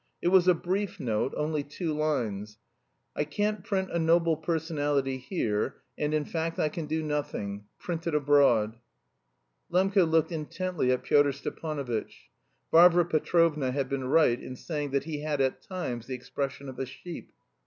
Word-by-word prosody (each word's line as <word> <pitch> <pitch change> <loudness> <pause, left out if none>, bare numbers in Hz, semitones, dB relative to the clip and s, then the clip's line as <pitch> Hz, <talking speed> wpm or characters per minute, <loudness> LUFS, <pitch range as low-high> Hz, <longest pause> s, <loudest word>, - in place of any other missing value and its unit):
It 175 - +1
was 185 -1 +5
a 180 - +6
brief 190 +4 -2
note, 115 -1 0
only 150 0 0
two 155 +3 -4
lines: 110 -9 -2 0.6
"I - - +1
can't 205 +6 -1
print 190 -1 -1
'A 170 - 0
Noble 165 0 +3
Personality' 145 -4 -1
here, 115 - -1 0.2
and 150 0 -1
in 155 -1 0
fact 165 +1 -3
I 155 - +2
can 155 0 -5
do 160 +1 -1
nothing; 105 -9 -3
print 170 -1 -4
it 165 - 0
abroad. 135 -7 +4
"Iv. - - -31
Shatov." - - -5
Lembke 190 -5 +4
looked 160 +1 +2
intently 165 -2 -1
at 125 - 0
Pyotr 145 -1 +4
Stepanovitch. 140 -4 -5 0.4
Varvara 175 +1 +7
Petrovna 155 -3 +2
had 135 0 -1
been 135 -1 -2
right 130 -3 +3
in 130 - -7
saying 150 +1 -4
that 140 0 0
he 150 -1 -4
had 150 -1 -1
at 130 -1 +1
times 125 - -5
the 130 - -3
expression 135 +2 -4
of 130 -1 -8
a 135 - -2
sheep. 170 +6 -9
150 Hz, 170 wpm, -28 LUFS, 130-165 Hz, 0.6 s, Varvara